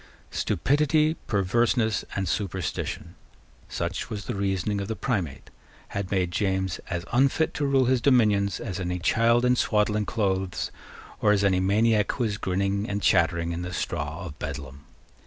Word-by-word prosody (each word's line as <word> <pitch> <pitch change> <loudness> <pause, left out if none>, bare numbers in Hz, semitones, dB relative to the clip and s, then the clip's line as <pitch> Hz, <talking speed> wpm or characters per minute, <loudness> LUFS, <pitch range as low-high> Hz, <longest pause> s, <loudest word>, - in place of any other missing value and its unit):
Stupidity, 150 +2 +2
perverseness, 110 +2 +1
and 95 -2 -1
superstition, 95 -4 -3 0.6
such 85 +2 -3
was 105 -3 -5
the - - -3
reasoning 100 0 -1
of 100 - -4
the 110 - -3
Primate, 90 - -3 0.4
had 100 -2 -4
made 90 -3 0
James 95 0 -1
as 85 +1 -3
unfit 135 +5 +2
to 145 - -1
rule 135 -2 +3
his 125 0 +2
dominions 105 -7 +3
as 95 -6 -4
any 90 -1 -2
child 115 +7 +3
in 125 0 +4
swaddling 105 -2 +1
clothes, 95 -4 -1 0.5
or 105 - +4
as 100 -1 +1
any 95 -2 +3
maniac 105 +2 +2
who 125 - -2
was 105 -2 -2
grinning 100 +3 -1
and 100 0 -2
chattering 85 -2 +2
in 85 +1 -3
the 90 0 -5
straw 80 +2 -3
of 75 -3 -9
Bedlam. 70 -2 -6
100 Hz, 155 wpm, -26 LUFS, 90-115 Hz, 0.6 s, in